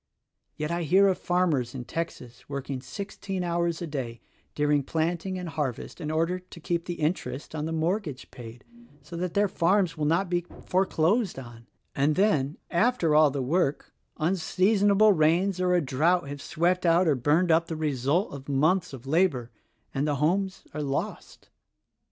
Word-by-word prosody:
Yet 150 +1 -3
I 170 +1 -1
hear 190 +5 +4
or' 190 - +4
farmers 165 -10 0
in 125 -2 -6
Texas 125 -6 -6
working 140 -2 -4
sixteen 190 +7 -5
hours 170 -1 -1
a - - -2
day 130 -7 -5 0.4
during 150 -1 +2
planting 170 +6 -2
and 180 -1 -5
harvest 150 0 -4
in 150 - -3
order 165 +3 0
to 180 -1 -14
keep 170 +1 -2
the 175 - -4
interest 155 -3 -3
on 155 -1 -3
the 160 - -3
mortgage 165 -3 -2
paid 120 -2 -11 0.4
so 150 +4 -9
that 180 0 -3
their 205 0 +3
farms 185 0 +2
shall 155 -1 -3
not 170 +6 +2
be 175 0 0 0.2
foreclosed 190 - +1
on; 120 -2 -10 0.3
and 145 +2 +2
then, 160 -8 +2
after 180 -3 +2
all 155 0 +6
the 140 -1 -3
work, 150 +1 0 0.3
unsea 185 +5 +1
sonable 205 +1 +5
rains 175 +4 +2
or 180 0 +3
a 175 - +3
drought 155 +4 +1
have 140 0 -7
swept 180 +3 0
out 170 +1 +4
or 155 - +4
burned 150 +7 +2
up 165 +1 +3
the 165 - -4
results 150 - 0
of 140 0 -9
months 155 +5 +2
of 130 -1 -9
labor 140 -6 +1 0.2
— - - -44
and 140 +2 0
the 145 - +1
homes 190 +7 0
are 150 - -3
lost. 140 -1 -4
165 Hz, 175 wpm, -27 LUFS, 145-180 Hz, 0.4 s, all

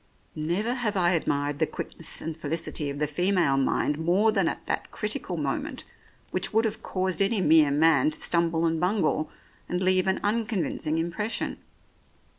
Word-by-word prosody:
Never 175 +10 -1
have 225 -5 -1
I 175 -1 +3
admired 145 -4 0
the - - +2
quickness - - -3
and 160 0 -4
felicity 155 -1 -2
of 140 - -5
the 150 - +1
female 175 -1 +1
mind 140 +2 +1
more 185 +7 +3
than 195 -5 +1
at - - -4
that - - -2
critical - - -3
moment - - -3 0.5
which - - -1
would 225 +1 +2
have 215 - -2
caused 185 0 -2
any 200 +2 +2
mere 155 -4 +5
man 150 -1 +4
to 155 - -4
stumble 170 -1 +1
and 165 -1 +1
bungle, 175 -4 +1 0.4
and 180 - -1
leave 185 0 +2
an 190 - +1
unconvincing 205 -7 -1
impression. 175 +7 -2
170 Hz, 165 wpm, -26 LUFS, 155-195 Hz, 0.5 s, mere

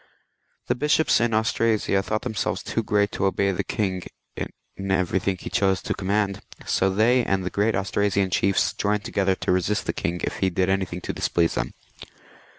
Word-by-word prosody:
The - - +1
bishops 150 +2 +2
in 120 -1 +2
Austrasia 110 -2 +1
thought 110 +2 -2
themselves 110 -5 -2
too 115 - -1
great 105 -2 +1
to 100 - -1
obey 100 0 +1
the 90 - -2
king 95 -3 -2 0.3
in - - -4 0.4
every 95 0 +1
thing 95 0 -1
he - - -7
chose 95 -1 +2
to - - -1
command, 100 0 -1 0.2
so 95 - +2
they 115 +6 +3
and 95 -3 0
the 90 - -2
great 105 +2 +1
Austra 100 +1 0
sian 95 -1 +1
chiefs 95 +2 +2
joined 105 0 0
together 95 -1 +1
to - - -1
resist 95 +3 +1
the - - -1
king 85 +1 -2
if - - -2
he 95 - +1
did 95 +1 0
anything 95 -2 -1
to - - -4
displease 85 -1 +1
them. - - -3
100 Hz, 190 wpm, -24 LUFS, 95-105 Hz, 0.4 s, they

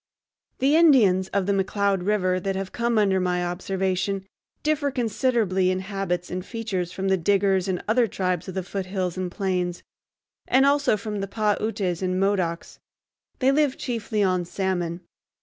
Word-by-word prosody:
The 275 +4 +3
Indians 230 - +5
of 200 -1 -1
the 200 - +1
McCloud 195 -1 0
River 185 -3 +1
that 195 +1 -2
have 190 0 -4
come 235 -1 0
under 195 -3 +3
my 180 -1 0
observation 190 +2 -2 0.4
differ 300 -2 +1
considerably 225 -6 +1
in 185 - +1
habits 190 -3 -3
and 180 0 -3
features 195 -6 -3
from 195 +1 -3
the 190 - +3
Diggers 195 +1 +2
and 185 -2 -2
other 230 +2 +3
tribes 180 -3 -2
of 185 - -6
the 190 - -2
foothills 185 -1 -3
and 185 -1 -3
plains, 180 -2 -2 0.6
and 270 +1 +4
also 280 -5 +3
from 210 -1 -4
the 195 - -3
Pah 210 0 +1
Utes 195 -5 -2
and 185 0 0
Modocs. 185 -4 -1 0.6
They 265 0 +3
live 290 -1 +2
chiefly 220 -4 -2
on 185 -2 +1
salmon. 175 -1 -2
195 Hz, 165 wpm, -24 LUFS, 185-215 Hz, 0.6 s, Indians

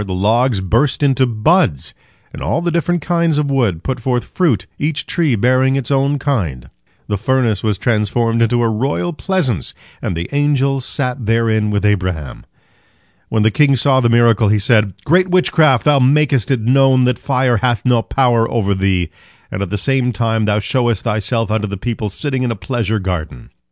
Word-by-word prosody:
The 95 -2 -5
logs 110 +3 +1
burst 120 +10 0
into 135 -2 +2
buds, 115 - +1 0.4
and - - -9
all 170 - -1
the 175 - 0
different 170 0 -1
kinds 170 -3 +1
of 145 -1 -1
wood 110 -11 0
put 130 -2 -3
forth 125 0 -1
fruit, 125 - -1
each 150 0 -2
tree 160 -8 0
bearing 130 +4 +2
its 135 -1 -3
own 140 +1 +1
kind. 90 - -3 0.3
The 105 -2 -3
furnace 120 -4 0
was 105 -3 -1
transformed 115 +2 0
into 120 +1 +2
a - - +2
royal 135 +10 -2
pleasance, 150 - -1 0.3
and 85 - -3
the 85 +2 -4
angels 140 -2 0
sat 125 -5 -3
therein 110 -2 +1
with 105 0 -1
Abraham. 90 -9 -2 0.8
When 110 -1 +1
the 110 - +3
king 140 +3 +3
saw 130 +1 +2
the 120 -2 +2
miracle, 115 -2 +3
he 105 +1 +2
said: 105 -1 +2
"Great 180 +5 +3
witchcraft! 160 -7 +3
Thou 145 -2 +3
makest 135 -2 +2
it 130 -4 0
known 130 +2 +3
that 125 -1 0
fire 125 -3 +1
hath 120 +3 -1
no 125 -2 +3
power 120 -2 +1
over 100 -4 0
thee, 95 -3 -1 0.4
and 95 - -4
at 100 - -3
the 105 - -2
same 130 +2 0
time 115 0 -1
thou 105 0 +1
showest 120 0 -1
thyself 115 0 -1
unto 110 -1 -1
the 100 0 -5
people 110 0 -4
sitting 130 +5 -3
in 125 - -1
a 115 - -2
pleasure 110 +2 -2
garden." 90 - -5
120 Hz, 185 wpm, -16 LUFS, 105-135 Hz, 0.8 s, the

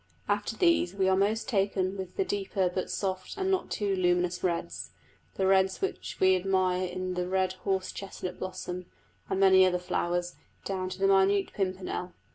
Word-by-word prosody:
After 205 +2 -1
these 335 - +3
we 190 -1 +2
are 190 - +4
most 215 +3 +1
taken 195 -4 0
with 190 -2 -7
the 390 - +1
deeper 195 - -1
but 185 - -2
soft 190 - -3
and 385 -1 0
not 380 - 0
too 200 -2 0
luminous 180 -1 +1
reds 175 -2 -2 0.5
the 190 - 0
red 190 0 +4
which 390 - -4
we 190 0 +5
admire 185 0 +1
in 185 +1 -3
the 180 0 -2
red 185 0 +1 0.2
horse 190 -1 0
chestnut 190 -2 -6
blossom, 180 -1 -5 0.4
and 190 - 0
many 190 -1 +7
other 185 -1 +3
flowers, 175 0 -2 0.3
down 185 -1 -2
to 185 - -6
the 195 0 +2
minute 195 +1 +3
pimpernel. 185 -2 -3
190 Hz, 175 wpm, -29 LUFS, 185-195 Hz, 0.5 s, many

